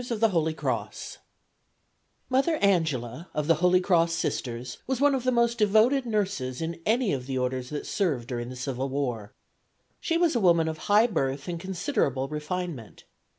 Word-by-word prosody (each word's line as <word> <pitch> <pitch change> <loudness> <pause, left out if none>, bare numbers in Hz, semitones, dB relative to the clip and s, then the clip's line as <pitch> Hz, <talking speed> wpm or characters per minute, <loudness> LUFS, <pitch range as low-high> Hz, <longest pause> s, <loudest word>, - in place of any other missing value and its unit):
Mother 270 +5 +2
Angela, 160 - 0
of 150 - 0
the 165 - +5
Holy 180 0 +5
Cross 170 -3 +2
Sisters, 125 -6 -3
was 260 -1 -1
one 285 0 +4
of 260 -2 -1
the 255 - +2
most 235 -1 +2
devoted 220 +6 +3
nurses 195 - -1
in 165 +1 -4
any 230 - +2
of 130 -2 -4
the 135 -1 -2
orders 125 0 -2
that 150 - -5
served 145 - -1
during 120 -1 -4
the 130 - -7
civil 130 +1 -3
war. 125 -7 -3 0.7
She 330 - 0
was 335 -4 +2
a - - +3
woman 170 -5 +4
of 160 -1 -4
high 210 +3 +6
birth 140 - -2
and 170 -1 -3
considerable 165 -7 -1
refinement. 150 - -5
165 Hz, 155 wpm, -27 LUFS, 130-215 Hz, 0.7 s, high